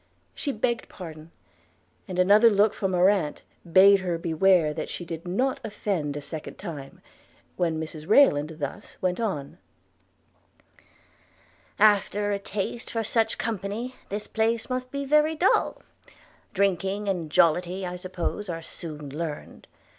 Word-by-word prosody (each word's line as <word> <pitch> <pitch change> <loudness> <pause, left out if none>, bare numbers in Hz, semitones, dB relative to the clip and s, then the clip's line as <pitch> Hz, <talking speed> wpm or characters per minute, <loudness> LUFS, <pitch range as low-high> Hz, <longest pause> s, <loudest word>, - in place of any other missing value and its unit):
She 285 - -2
begged 235 0 -1
pardon; 160 -3 -10 0.8
and 185 -2 -5
another 205 +5 +6
look 210 0 +3
from 190 -2 -2
her 180 +1 +5
aunt 190 -7 0 0.3
bade 195 +3 +7
her 180 -3 -2
beware 165 -1 +3
that - - -5
she 175 - -6
did 165 +1 -7
not 255 +9 0
offend 180 -9 -2
a - - -5
second 155 +1 -7
time 150 -8 -8 0.3
– - - -34
when 165 -3 0
Mrs 155 -1 -7
Rayland 160 - +5
thus 140 -3 -6
went 180 +1 -1
on: 170 -12 -3 2.2
'After 205 0 +3
a 200 - -1
taste 200 +4 -4
for 225 -1 -2
such 225 +1 +1
company, 225 +3 -3 0.2
this 205 +1 -4
place 225 +2 -1
must 255 0 -2
be 280 +1 -4
very 300 +3 +3
dull: 355 +5 +2 0.7
drinking 200 0 0
and 175 -5 -1
jollity, 180 +4 +2
I 180 0 -4
suppose, 185 +2 -4
are 165 -1 -4
soon 150 -5 -7
learned. 155 -2 -6
190 Hz, 140 wpm, -26 LUFS, 165-215 Hz, 2.2 s, bade